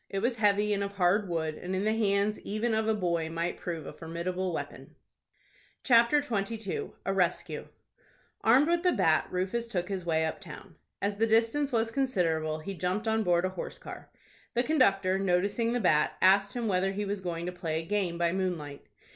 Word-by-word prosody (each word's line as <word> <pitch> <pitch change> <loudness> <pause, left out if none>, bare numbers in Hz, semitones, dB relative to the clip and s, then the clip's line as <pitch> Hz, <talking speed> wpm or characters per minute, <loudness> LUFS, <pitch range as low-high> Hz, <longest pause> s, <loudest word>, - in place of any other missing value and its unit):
It 195 - -4
was 235 +4 0
heavy, 210 -1 +2
and 200 0 0
of 200 0 -4
hard 195 +1 +2
wood, 160 -2 -1
and 180 +4 -5
in 190 - -1
the 215 +1 +1
hands 205 -1 +1
even 220 +3 -2
of 220 0 0
a 220 - +2
boy 170 -5 -1
might 170 +1 -3
prove 165 -4 -5
a - - -7
formidable 175 +3 -3
weapon. 165 - -7 0.9
CHAPTER 240 +4 +5
XXII. 215 -4 -3
A 195 - 0
RESCUE. 180 -2 -1 0.8
Armed 260 +7 +5
with 340 0 +2
the 360 -1 +3
bat, 160 -1 +2
Rufus 190 +6 -2
took 180 -5 -3
his 190 -2 -3
way 160 -1 +1
up 160 - -4
town. 170 -6 -10 0.3
As 200 0 -1
the 225 +1 +2
distance 230 +6 +2
was 225 -1 +1
considerable, 165 - 0
he 195 +5 -5
jumped 185 +5 -2
on 220 0 +2
board 175 -3 +2
a - - 0
horse 185 - -6
car. - - -10 0.5
The 240 - +3
conductor, 195 -10 +2
noticing 200 +5 +1
the 245 - 0
bat, 155 -8 +3
asked 195 +2 +4
him 240 -2 -2
whether 190 0 +1
he 205 +1 -2
was 200 0 -3
going 170 -2 -4
to 180 - -3
play 165 -3 -3
a 165 - -7
game 190 -3 -1
by 170 0 +1
moonlight. 170 -7 -3
195 Hz, 195 wpm, -29 LUFS, 175-220 Hz, 0.9 s, CHAPTER